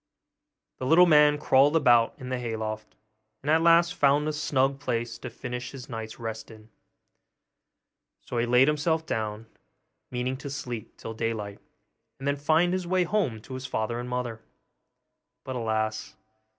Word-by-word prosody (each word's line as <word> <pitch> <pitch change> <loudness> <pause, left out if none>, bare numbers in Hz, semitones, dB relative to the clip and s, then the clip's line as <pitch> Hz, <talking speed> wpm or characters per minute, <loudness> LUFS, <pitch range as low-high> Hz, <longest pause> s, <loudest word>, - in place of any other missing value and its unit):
The 130 - -3
little 170 +5 +7
man 150 -3 +5
crawled 145 +1 +4
about 120 -7 +4
in 130 - -8
the 130 -1 -2
hay 115 -2 -3
loft, 110 -1 -5 0.5
and 150 - 0
at 160 +1 +4
last 170 +1 +5
found 145 -1 +3
a 155 - -1
snug 140 -2 0
place 120 -4 -3
to 130 - -6
finish 125 +1 -6
his 135 -2 -10
night's 110 -2 -6
rest 110 -1 -6
in; 110 -1 -15 1.6
so 120 - -3
he 120 - 0
laid 125 +3 +5
himself 160 +2 +1
down, 110 -4 -3 0.6
meaning 125 +1 -2
to 140 +1 -7
sleep 125 -5 -6
till 115 - -7
daylight, 110 -3 -3 0.6
and 135 - -6
then 140 - +2
find 160 +5 +2
his 185 -2 -2
way 185 0 +2
home 175 - -1
to 130 - -10
his 130 0 -5
father 115 +1 -2
and 120 0 -5
mother. 125 -3 -3 1.0
But 130 - -5
alas! 110 -2 -2
130 Hz, 165 wpm, -27 LUFS, 115-150 Hz, 1.6 s, little